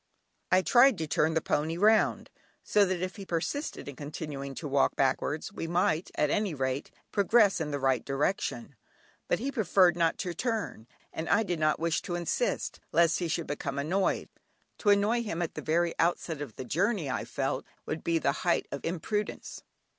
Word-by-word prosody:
I 185 Hz, 0 st, +5 dB
tried 250 Hz, 0 st, +6 dB
to 160 Hz, -, -2 dB
turn 155 Hz, +1 st, +1 dB
the 160 Hz, -, +2 dB
pony 160 Hz, +3 st, 0 dB
round, 215 Hz, +3 st, +3 dB, 0.3 s
so 205 Hz, -1 st, +4 dB
that 185 Hz, -1 st, -1 dB
if 185 Hz, +3 st, -4 dB
he 200 Hz, -, -7 dB
persisted 180 Hz, -, -3 dB
in 140 Hz, -, -7 dB
continuing 145 Hz, -1 st, -6 dB
to 150 Hz, -, -5 dB
walk 140 Hz, 0 st, +2 dB
backwards, 145 Hz, +7 st, 0 dB
we 165 Hz, -, -4 dB
might 170 Hz, -1 st, +1 dB
at 150 Hz, -1 st, +1 dB
any 205 Hz, -6 st, 0 dB
rate 130 Hz, 0 st, -2 dB, 0.2 s
progress 205 Hz, -2 st, +4 dB
in 155 Hz, -, -2 dB
the 145 Hz, -, -2 dB
right 130 Hz, -3 st, +1 dB
direction, 140 Hz, -, -2 dB, 0.5 s
but -, -, +2 dB
he 270 Hz, +4 st, -3 dB
preferred 190 Hz, -7 st, +4 dB
not 165 Hz, -1 st, +1 dB
to 180 Hz, -3 st, -3 dB
turn, 215 Hz, -, -3 dB, 0.3 s
and 160 Hz, -, -4 dB
I 225 Hz, -, +4 dB
did 175 Hz, -5 st, -2 dB
not 155 Hz, 0 st, +2 dB
wish 165 Hz, 0 st, 0 dB
to 175 Hz, -, -4 dB
insist, 175 Hz, -, -1 dB
lest 170 Hz, -1 st, +3 dB
he 175 Hz, -, -1 dB
should 165 Hz, 0 st, -1 dB
become 140 Hz, -1 st, -4 dB
annoyed; 175 Hz, +7 st, 0 dB, 0.5 s
to 210 Hz, -, +1 dB
annoy 205 Hz, +4 st, +3 dB
him 185 Hz, -8 st, -4 dB
at 170 Hz, -2 st, -2 dB
the -, -, -5 dB
very 170 Hz, +2 st, +1 dB
outset 165 Hz, -2 st, 0 dB
of 130 Hz, -7 st, -7 dB
the 130 Hz, -, -6 dB
journey 185 Hz, -, 0 dB
I 130 Hz, -, -2 dB
felt 135 Hz, -1 st, -2 dB, 0.2 s
would 160 Hz, -, -4 dB
be 170 Hz, -1 st, +1 dB
the 140 Hz, -3 st, +1 dB
height 175 Hz, -1 st, +1 dB
of 140 Hz, -, -5 dB
imprudence. 200 Hz, +5 st, -3 dB
170 Hz, 190 wpm, -29 LUFS, 145-195 Hz, 0.5 s, tried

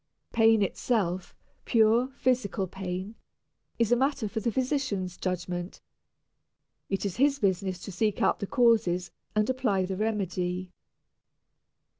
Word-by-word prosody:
Pain 225 Hz, -2 st, +5 dB
itself 190 Hz, -3 st, -1 dB, 0.3 s
pure 230 Hz, +2 st, +4 dB
physical 245 Hz, -7 st, +1 dB
pain 185 Hz, +2 st, -5 dB, 0.6 s
is 230 Hz, -1 st, +1 dB
a -, -, +7 dB
matter 265 Hz, -2 st, 0 dB
for 220 Hz, +2 st, -3 dB
the 230 Hz, +2 st, -1 dB
physician's 250 Hz, -, -1 dB
judgment. 180 Hz, -1 st, -4 dB, 1.1 s
It 195 Hz, +1 st, -1 dB
is 195 Hz, -, -3 dB
his 280 Hz, +2 st, +3 dB
business 190 Hz, -5 st, 0 dB
to 200 Hz, -, -6 dB
seek 210 Hz, +3 st, 0 dB
out -, -, +2 dB
the 200 Hz, -, -3 dB
causes 220 Hz, -9 st, +2 dB, 0.2 s
and 215 Hz, 0 st, +2 dB
apply 245 Hz, -8 st, +1 dB
the 190 Hz, 0 st, -4 dB
remedy. 185 Hz, -4 st, -2 dB
205 Hz, 125 wpm, -28 LUFS, 185-235 Hz, 1.1 s, a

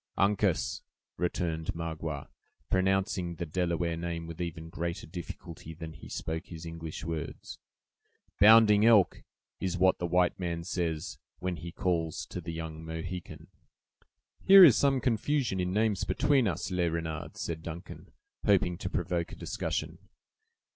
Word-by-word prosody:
"Uncas," 100 Hz, -3 st, +1 dB, 0.3 s
returned 85 Hz, -2 st, -2 dB
Magua, 80 Hz, -3 st, -4 dB, 0.4 s
pronouncing 95 Hz, -2 st, +1 dB
the 85 Hz, -, -4 dB
Delaware 85 Hz, 0 st, -1 dB
name 85 Hz, 0 st, -4 dB
with 85 Hz, +1 st, -7 dB
even 80 Hz, -1 st, -5 dB
greater 85 Hz, 0 st, -4 dB
difficulty 80 Hz, -1 st, -8 dB
than 80 Hz, -1 st, -7 dB
he -, -, -12 dB
spoke 80 Hz, +2 st, -4 dB
his 85 Hz, -1 st, -9 dB
English 80 Hz, -1 st, -6 dB
words. 80 Hz, -1 st, -5 dB, 0.8 s
"'Bounding 105 Hz, 0 st, +7 dB
Elk' 110 Hz, -4 st, +5 dB, 0.4 s
is 90 Hz, -1 st, -2 dB
what 95 Hz, +1 st, +4 dB
the 85 Hz, -, -1 dB
white 90 Hz, +1 st, +2 dB
man 85 Hz, -2 st, -2 dB
says, 85 Hz, -3 st, -3 dB, 0.2 s
when 90 Hz, -1 st, -3 dB
he 85 Hz, +3 st, -7 dB
calls 85 Hz, -3 st, -1 dB
to 90 Hz, -, -6 dB
the 85 Hz, 0 st, -5 dB
young 80 Hz, -1 st, -6 dB
Mohican." 80 Hz, +2 st, -6 dB, 1.0 s
"Here 195 Hz, 0 st, +10 dB
is 140 Hz, -10 st, +9 dB
some 135 Hz, -2 st, +3 dB
confusion 120 Hz, -2 st, 0 dB
in 90 Hz, 0 st, 0 dB
names 105 Hz, -1 st, +1 dB
between 140 Hz, -3 st, +2 dB
us, 90 Hz, +1 st, -2 dB
Le 90 Hz, -2 st, +1 dB
Renard," 80 Hz, 0 st, -4 dB
said 80 Hz, -1 st, -4 dB
Duncan, 85 Hz, +1 st, -8 dB, 0.3 s
hoping 90 Hz, -1 st, +2 dB
to 95 Hz, -, -3 dB
provoke 90 Hz, -2 st, -2 dB
a -, -, -8 dB
discussion. -, -, -3 dB
85 Hz, 140 wpm, -30 LUFS, 80-95 Hz, 1.0 s, Here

